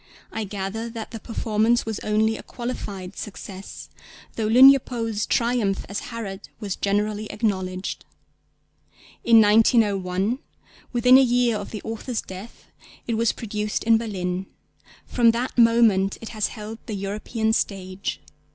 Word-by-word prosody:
I 220 -1 -3
gather 205 +3 -4
that 225 -1 -7
the 225 - -6
performance 225 +1 0
was 220 -2 -3
only 220 +1 +1
a - - -7
qualified 200 -6 -6
success, 195 -1 -8 0.5
though 220 -2 -1
Lugne 265 +5 +8
Poë's 225 -4 -3
triumph 230 -5 +1
as 200 +4 -5
Herod 210 -4 -6
was 205 -4 -3
generally 210 +1 -1
acknowledged. 190 -4 -2 1.2
In 230 -1 +7
1901, 210 -1 +3 0.5
within 250 +2 +6
a - - +6
year 245 -2 +2
of 205 -1 -5
the 215 - -7
author's 225 +2 -4
death, 190 +5 -10 0.4
it 235 - -2
was 225 0 +2
produced 210 -1 -3
in 225 0 +4
Berlin; 185 -4 -3 0.6
from 235 -2 +3
that 245 +2 -3
moment 230 -5 +4
it 225 - -8
has 215 -2 -1
held 220 0 -8
the 215 - -3
European 215 +3 -2
stage. 190 -3 -3
220 Hz, 135 wpm, -24 LUFS, 200-230 Hz, 1.2 s, Lugne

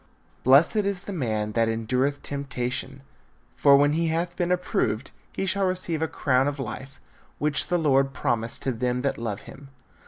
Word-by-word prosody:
Blessed 140 - +5
is 200 -3 0
the 200 - -6
man 110 - -1
that 115 +1 +2
endureth 125 +5 -1
temptation; 135 -1 -4 0.5
for 140 -1 +6
when 145 +1 +3
he 165 +1 +1
hath 170 +2 -1
been 175 0 -1
approved, 180 -10 -1 0.2
he 195 - -3
shall 195 +1 +1
receive 185 -3 -2
a 160 - +1
crown 130 -3 +1
of 145 0 -2
life, 135 +2 -6 0.4
which 150 0 +1
the 180 - +1
Lord 135 -4 +3
promised 120 -4 -2
to 135 - 0
them 125 +1 -1
that 140 - -1
love 110 -4 -3
him. 140 +1 -12
140 Hz, 175 wpm, -25 LUFS, 125-165 Hz, 0.5 s, for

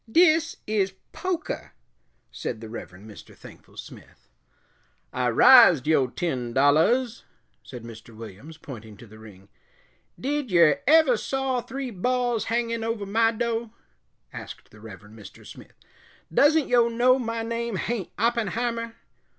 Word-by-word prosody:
"Dis 325 +1 +3
is 200 -3 -1 0.2
pokah," 370 -3 -4 0.6
said 115 - -5
the 110 -1 -10
Reverend 100 -3 -10
Mr. 105 - -14
Thankful - - -16
Smith. - - -13 0.9
"I 125 -1 0
rised 175 - +7
yo' 150 -4 +2
ten 125 -5 -4
dollahs," 165 - +2 0.4
said 125 -3 -11
Mr. 115 0 -12
Williams, 115 +8 -11
pointing 110 -9 -11
to 120 - -13
the 110 0 -16
ring. 100 -3 -15 0.7
"Did 285 -1 -2
yer 170 -5 +4
ever 305 -5 +5
saw 265 0 -2
three 260 +2 -6
balls 245 +3 -1
hangin' 230 0 -2
over 225 -2 -3
my 225 +3 +2
do'?" 230 0 -3 0.6
asked - - -10
the 105 - -17
Reverend 105 0 -13
Mr. 100 - -14
Smith. - - -14 0.6
"Doesn't 290 - +4
yo' 240 -1 +3
know 245 +3 +2
my 230 -2 -3
name 230 -1 -3
hain't 215 -1 -3
Oppenheimer?" 230 0 -2
225 Hz, 135 wpm, -25 LUFS, -, 0.9 s, rised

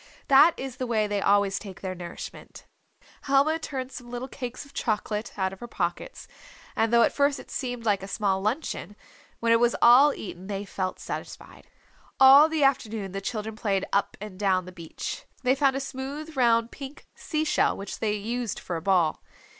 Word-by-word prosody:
That 280 +5 +7
is 265 -2 -6
the 255 - -3
way 220 -3 +1
they 205 -1 -1
always 200 -1 +2
take 195 -4 -10
their 185 -1 -3
nourishment. 175 -1 -9 0.6
Helma 285 +3 +3
turned 265 -4 -5
some 245 -2 -10
little 245 +2 -5
cakes 255 0 -7
of 280 - -18
chocolate 215 0 -2
out 190 -1 -1
of 190 - -12
her 240 - -7
pockets, 175 -6 -4 0.5
and 225 0 +1
though 235 0 +6
at - - +2
first 280 0 +2
it - - -12
seemed 245 -3 -4
like 205 -3 +2
a 195 - -7
small 195 -2 0
luncheon, 215 -1 -3 0.5
when 230 0 +2
it 230 - +5
was 240 0 +3
all 260 +5 +7
eaten 185 -6 -8
they 200 0 -4
felt 185 -1 -4
satisfied. - - -8 0.5
All 275 +4 +9
the 315 -2 0
afternoon 220 -7 0
the 195 +1 -4
children 215 +1 -4
played 200 -3 -1
up 200 0 0
and 200 -2 -9
down 190 -3 +1
the 185 - -9
beach. 175 - -7 0.2
They 255 0 +4
found 275 -1 +2
a - - 0
smooth 280 +4 -6
round 235 -2 +3
pink 275 0 -9
sea 310 -3 -2
shell - - +2
which 195 0 -7
they 215 -2 0
used 225 +1 -3
for 175 - -5
a - - -6
ball. 175 -3 +2
230 Hz, 195 wpm, -26 LUFS, 195-265 Hz, 0.6 s, All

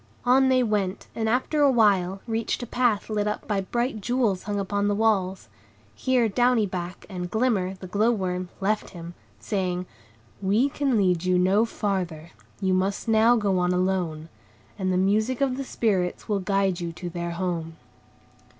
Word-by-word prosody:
On 260 +2 +5
they 255 -1 +4
went, 205 -4 -1
and 220 -1 -1
after 260 +6 +1
a 285 - +6
while, 195 -5 +2
reached 230 +1 -2
a - - -3
path 240 -3 +1
lit 210 -1 -1
up 210 - -3
by 205 -2 0
bright 235 +3 -2
jewels 230 -4 0
hung 205 0 -3
upon 200 +1 -1
the 205 - +1
walls. 195 - +1 0.5
Here 250 - +1
Downy 240 +1 +2
Back, 180 -1 -6
and 180 -3 -5
Glimmer, 210 -4 0
the 190 - -10
glow 205 +5 +1
worm, 185 -5 -2
left 210 +2 -1
him, 170 +1 -8 0.3
saying,— 180 - -2 0.6
"We 210 +8 +2
can 275 -4 0
lead 180 -4 +2
you 185 0 +2
no 190 +5 +3
farther; 180 -7 -3 0.3
you 190 -2 +1
must 190 +3 -1
now 225 +2 +5
go 200 -5 +1
on 180 0 +1
alone, 180 -4 -1 0.5
and 190 -2 -1
the 180 - +1
music 215 +6 +1
of 270 -2 +1
the 275 - -3
Spirits 195 -8 -1
will 205 -2 0
guide 195 -1 0
you 170 -1 -3
to 175 +2 -7
their 170 0 -4
home." 170 -3 -3
200 Hz, 175 wpm, -25 LUFS, 185-225 Hz, 0.6 s, a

